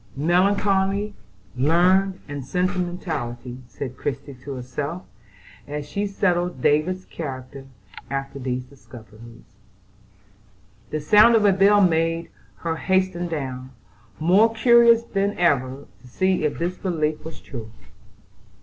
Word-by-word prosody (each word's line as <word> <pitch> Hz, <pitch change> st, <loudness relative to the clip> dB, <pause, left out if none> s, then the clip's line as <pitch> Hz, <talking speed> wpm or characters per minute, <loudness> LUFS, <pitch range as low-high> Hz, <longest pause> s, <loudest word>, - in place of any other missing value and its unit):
"Melancholy, 195 Hz, +5 st, +1 dB, 0.4 s
learned, 180 Hz, +7 st, +3 dB
and 145 Hz, -2 st, -6 dB
sentimental," 175 Hz, -5 st, -2 dB, 0.3 s
said 130 Hz, 0 st, -7 dB
Christie 140 Hz, +2 st, -4 dB
to 135 Hz, +2 st, -8 dB
herself, 140 Hz, +7 st, -5 dB, 0.6 s
as 150 Hz, 0 st, -5 dB
she 205 Hz, +6 st, -2 dB
settled 180 Hz, -5 st, 0 dB
David's 160 Hz, +8 st, +1 dB
character 135 Hz, -3 st, -7 dB, 0.4 s
after 135 Hz, 0 st, -4 dB
these 125 Hz, -1 st, -3 dB
discoveries. 115 Hz, -4 st, -15 dB, 1.3 s
The 155 Hz, -, -3 dB
sound 210 Hz, +9 st, +6 dB
of 215 Hz, -2 st, +3 dB
a 200 Hz, -, +5 dB
bell 200 Hz, +2 st, +5 dB
made 165 Hz, -2 st, +1 dB, 0.3 s
her 165 Hz, -1 st, -1 dB
hasten 185 Hz, -1 st, 0 dB
down, 130 Hz, -5 st, -5 dB, 0.5 s
more 195 Hz, +8 st, +4 dB
curious 235 Hz, 0 st, +5 dB
than 200 Hz, -2 st, -1 dB
ever 140 Hz, -5 st, +1 dB, 0.2 s
to 125 Hz, -, -16 dB
see 185 Hz, +6 st, 0 dB
if 150 Hz, -, -1 dB
this 175 Hz, +2 st, -3 dB
belief 155 Hz, -5 st, -1 dB
was 160 Hz, +1 st, -9 dB
true. 115 Hz, -5 st, -8 dB
165 Hz, 115 wpm, -23 LUFS, 135-190 Hz, 1.3 s, sound